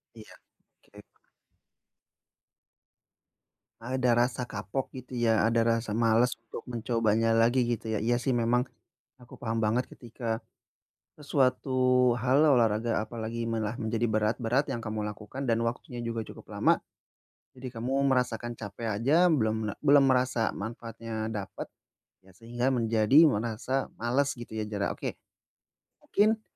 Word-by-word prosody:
Iya. 110 -1 -13 0.5
Oke. - - -15 2.8
Ada 125 +2 -1 0.2
rasa 125 0 -5
kapok, 105 +3 -4
gitu 130 0 -9
ya, 115 -2 +3
ada 115 0 +2
rasa 115 -2 0
males 115 +2 +3
untuk 115 -1 -10
mencobanya 115 -2 +1
lagi, 115 +3 +3
gitu 120 -1 -2
ya. - - 0
Iya 120 +1 +2
sih, 130 0 0
memang 120 +2 +1 0.5
aku 120 - -14
paham 115 -1 -2
banget 115 +4 +1
ketika 115 -1 -5 0.7
sesuatu 130 -3 +2
hal, 130 +4 +3
olahraga, 115 -6 +3
apalagi 115 0 -5
malah 110 -1 -2
menjadi 115 +1 -1
berat 110 +1 +1
berat 125 +5 +1
yang 120 - -3
kamu 110 -1 -3
lakukan 105 +6 -6
dan 115 -1 +1
waktunya 120 +1 -4
juga 115 -1 -3
cukup - - -13
lama, - - +3 0.8
jadi 130 -1 -8
kamu 125 +3 -2 0.2
merasakan 120 -2 -1
capek 105 +2 -6
aja 165 +8 +4
belum 110 -5 0
la - - -8
belum 140 0 +5
merasa 125 -3 +2
manfaatnya 115 0 -5
dapat 100 -3 -5 0.6
ya 95 -1 -21
sehingga 120 +4 -2
menjadi 115 +5 +5
merasa 120 +3 -2
males, 130 +5 +1
gitu 120 -2 -10
ya, 110 - -1
jarang. 100 -2 -2
Oke, - - -5 0.9
mungkin 215 +2 +2
115 Hz, 135 wpm, -28 LUFS, 110-125 Hz, 2.8 s, belum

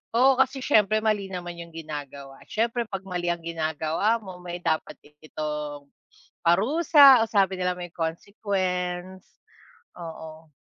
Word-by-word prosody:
Oo, 260 +2 +5
kasi 265 +1 +2
siyempre 215 -5 +3
mali 210 -3 0
naman 175 -1 -6
yung 170 0 -9
ginagawa. 145 -4 -8
Siyempre 235 +2 0
'pag 195 -2 -6
mali 180 -2 -3
ang 170 -1 -5
ginagawa 165 +6 -1
mo, 185 -2 -10
may 175 0 -7
dapat 160 -1 -1
din 150 0 -21
itong 150 -2 -5 0.6
parusa 270 - +6
o - - -15
sabi 195 -2 +2
nila 180 0 0
may 175 0 -7
consequence, 180 +1 -3 0.7
oo. 160 -2 -10
180 Hz, 135 wpm, -25 LUFS, 160-210 Hz, 0.7 s, parusa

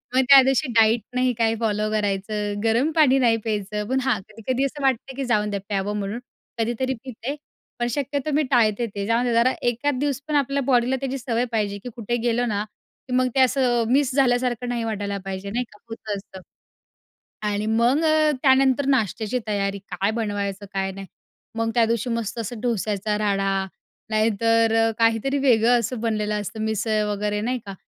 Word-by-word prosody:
मग 260 - +5
त्या 275 -1 +10
दिवशी 270 +2 +1
डाईट 225 +1 +4
नाही 255 0 +2
काही 225 -1 +1
फॉलो 215 -1 0
करायचं, 205 0 -2
गरम 235 +8 +2
पाणी 285 -5 +5
नाही 235 -3 +3
प्यायचं, 210 -1 -3
पण 265 0 +1
हां, 250 -6 +1
कधी-कधी 245 +5 -2
असं 285 +2 -5
वाटतं 265 0 0
की 270 0 -3
जाऊन 210 -3 +1
द्या 200 - -2
प्यावं 205 0 -2
म्हणून 205 +4 -4 0.4
कधीतरी 240 +3 -1
पिते. 260 +2 -5 0.4
पण 240 - 0
शक्यतो 285 +3 -2
मी 305 - +3
टाळते 235 -2 +3
ते. 200 0 -2
जाऊन 230 +2 +1
द्या 240 - 0
जरा 235 +3 +3 0.2
एखाद 255 +3 -1
दिवस 280 -2 -1
पण 300 - -1
आपल्या 280 0 +1
बॉडीला 250 -1 +2
त्याची 270 0 -2
सवय 240 -1 -1
पाहिजे 205 -3 -1
की 250 - -5
कुठे 235 0 -2
गेलो 240 0 +1
ना, 210 -3 -1 0.4
की 250 - -4
मग 255 0 +3
ते - - +3
असं 250 -2 +3
मिस 275 0 +3
झाल्यासारखं 245 -2 +1
नाही 235 -1 -2
वाटायला 205 -2 -3
पाहिजे, 195 +1 -5
नाही 245 +3 -1
का, 210 - -17
होतं 220 -2 -5
असतं. 190 -1 -11 1.1
आणि 210 +1 -1
मग 235 +7 +2
अ, 310 -1 +4
त्यानंतर 265 0 +4
नाश्त्याची 230 -2 0
तयारी, 200 -1 -1
काय 195 +1 -2
बनवायचं 200 -2 -3
काय 195 0 -1
नाही. 195 0 -8 0.5
मग 225 0 0
त्या 235 - +4
दिवशी 230 +1 -1
मस्त 230 -1 -3
असं 230 +1 -5
डोश्याचा 210 -3 -1
राडा 195 -2 0 0.6
नाहीतर 225 +1 +2
अ, - - 0
काहीतरी 230 +5 +2
वेगळं 245 -2 +4
असं 230 +1 -4
बनलेलं 215 -2 -1
असतं, 210 +2 -6
मिसळ 220 0 0
वगैरे 210 0 -2
नाही 245 +4 -1
का. 195 - -6
230 Hz, 185 wpm, -23 LUFS, 210-255 Hz, 1.1 s, त्या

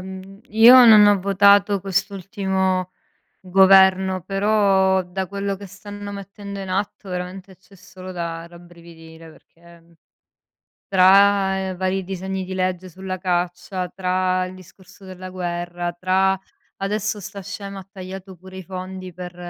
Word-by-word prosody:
mhmm, 190 +1 -10
io 225 +4 +7
non 215 -2 +8
ho 205 -2 +4
votato 200 +1 +4
quest'ultimo 190 -1 -2 0.5
governo, 190 0 +4
però 195 -1 +2
da 185 +1 -5
quello 200 +1 -4
che 200 +1 -10
stanno 205 +2 -9
mettendo 200 0 -8
in 190 -1 -6
atto, 195 +1 -4
veramente, 180 +1 -7
c'è 195 +1 -22
solo 185 0 -11
da 170 -1 -5
rabbrividire, 170 -1 -15
perché, 170 +2 -20
mhmm, 170 +1 -26 1.0
tra 190 0 +4
vari 190 +1 -1
disegni 190 +1 -5
di 185 - -8
legge 185 0 -2
sulla 185 +1 -6
caccia, 180 +1 -2
tra 185 0 0
il 185 0 -10
discorso 185 +1 -17
della 185 0 -9
guerra, 175 -1 -4
tra 185 +2 +1 0.4
adesso 210 +1 -2
'sta 200 +1 -8
scema 200 +1 -8
ha 190 0 -12
tagliato 190 -1 -9
pure 185 +2 -14
i 190 - -8
fondi 185 0 -8
per, 180 0 -9
190 Hz, 135 wpm, -21 LUFS, 180-195 Hz, 1.0 s, non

